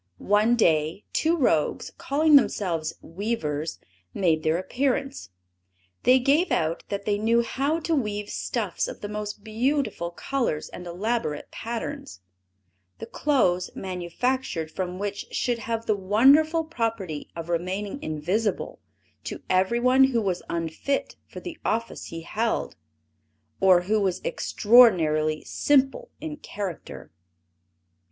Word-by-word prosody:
One 210 - +3
day, 160 -3 +1
two 330 +2 +2
rogues, 165 - +1
calling 300 +2 +3
themselves 170 - +2
weavers, 165 -6 -3 0.4
made 165 -5 +2
their 160 +1 +1
appearance. 270 - -2 0.7
They 255 +1 +6
gave 285 +8 +2
out 160 +1 0
that 200 0 -4
they 205 -1 0
knew 230 +2 +3
how 280 +7 -1
to 330 - -1
weave 210 -7 -1
stuffs - - -2
of - - -8
the 205 - -4
most 210 0 -5
beautiful 225 -4 -1
colors 175 - -2
and 180 - -9
elaborate 180 -3 -2
patterns, 225 - -6 0.8
the - - -7
clothes 185 -12 +1
manufactured 180 0 -2
from 180 0 -4
which 200 0 -4
should 240 -2 0
have 230 0 -3
the 215 - +2
wonderful 275 - +4
property 225 - -3
of 165 -1 -6
remaining 185 +8 -3
invisible 175 +8 -2 0.5
to - - -6
everyone 240 +8 +4
who 245 -4 +1
was 185 -3 -1
unfit 170 - -2
for - - -9
the 345 -3 -8
office 230 +1 -2
he 165 0 -7
held, 220 +7 -2 0.8
or 185 -2 +6
who 210 +4 +1
was 185 -2 0
extraordinarily 165 -10 +4
simple 285 - +1
in 310 -2 -6
character. 200 - -7
210 Hz, 125 wpm, -25 LUFS, 175-255 Hz, 0.8 s, They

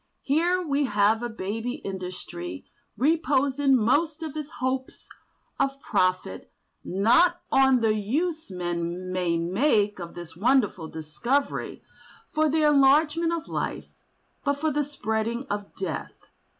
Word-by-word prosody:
Here 345 +6 +2
we 285 -1 +1
have 210 -1 +2
a 240 - -3
baby 225 +3 -4
industry 180 - -6 0.3
reposing 280 -2 +2
most 295 +8 +1
of 310 -2 -6
its 300 -1 -5
hopes 260 -2 -4 0.5
of 275 0 0
profit 185 - -1 0.3
not 330 - +3
on 265 -2 +5
the 220 -1 +3
use 305 - -2
men 175 0 -3
may 180 -2 0
make 205 - +1
of 170 -1 -8
this 175 -2 -9
wonderful 205 -5 +2
discovery 200 - -2 0.5
for 310 0 +2
the 310 +1 +2
enlargement 300 +3 +4
of 335 -1 -3
life, - - -3 0.5
but 285 -1 +1
for 310 +1 0
the 295 +1 +1
spreading 230 -2 -2
of 205 0 -4
death. 170 -7 -6
250 Hz, 125 wpm, -26 LUFS, 190-295 Hz, 0.5 s, on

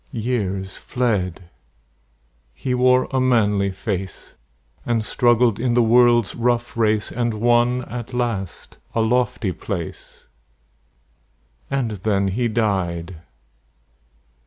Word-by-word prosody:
Years 100 -5 -2
fled; 95 -8 -2 1.0
he 125 - -3
wore 125 0 +3
a 135 - +1
manly 105 -6 +2
face, 95 -1 -5 0.5
And 115 -2 -1
struggled 120 -1 +2
in 120 0 0
the 120 - +4
world's 120 -1 +4
rough 120 0 -1
race, 110 -2 +1
And 120 -2 -1
won 120 +2 +2
at 120 -1 -7
last 115 -7 -4 0.2
a 115 - +2
lofty 115 -3 0
place. 85 -1 -7 1.4
And 135 -5 -1
then 100 0 0
he 120 +5 0
died! 95 -6 -1
115 Hz, 105 wpm, -21 LUFS, 100-120 Hz, 1.4 s, the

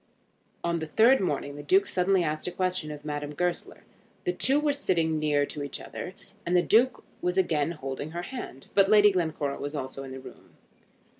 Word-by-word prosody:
On 170 0 0
the 160 - -4
third 235 - +5
morning 145 -5 -2
the - - -6
Duke 190 +7 +3
suddenly 185 0 +2
asked 155 0 -2
a - - -2
question 185 -3 -1
of 150 -1 -8
Madame 145 0 -4
Goesler. 180 +2 -3 0.4
The 360 - 0
two 275 -2 +3
were 300 -1 +2
again 285 - -5
sitting 160 - +1
near 145 -2 +2
to 145 - -7
each 140 - -5
other, 185 - -7 0.3
and 180 -1 +2
the 175 - +4
Duke 245 +3 +3 0.2
was 180 +1 -1
again 165 -4 +1
holding 140 -1 -5
her 170 +2 -5
hand; 210 - -8
but 195 -1 +4
Lady 210 -1 +7
Glencora 160 -6 -1
was 145 +2 -4
also 130 -1 -5
in 135 - -8
the 130 - -7
room. - - -14
170 Hz, 205 wpm, -27 LUFS, 145-190 Hz, 0.4 s, Lady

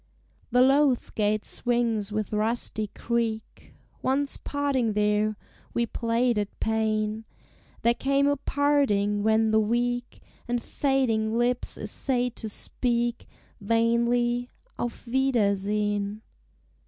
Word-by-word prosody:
The 250 +1 +5
loath 270 -1 +3
gate 210 0 0
swings 230 -4 -1
with 215 0 -2
rusty 215 0 0
creak; 225 0 -3 0.3
Once, 275 +2 0
parting 275 -6 -1
there, 210 0 +1 0.4
we 235 - +2
played 235 0 0
at 205 -1 -5
pain; 220 0 0 0.6
There 235 - +5
came 275 +3 +1
a 285 - +3
parting, 270 -9 +1
when 220 +1 +3
the 220 - +4
weak 245 +2 -1 0.2
And 240 0 0
fading 230 -6 0
lips 245 +1 +1
essayed 250 -2 -2
to 220 - -5
speak 240 +2 -2 0.3
Vainly, 235 +3 +1 0.3
"Auf 240 +1 -4
wiedersehen!" 210 -4 0
235 Hz, 105 wpm, -26 LUFS, 215-245 Hz, 0.6 s, The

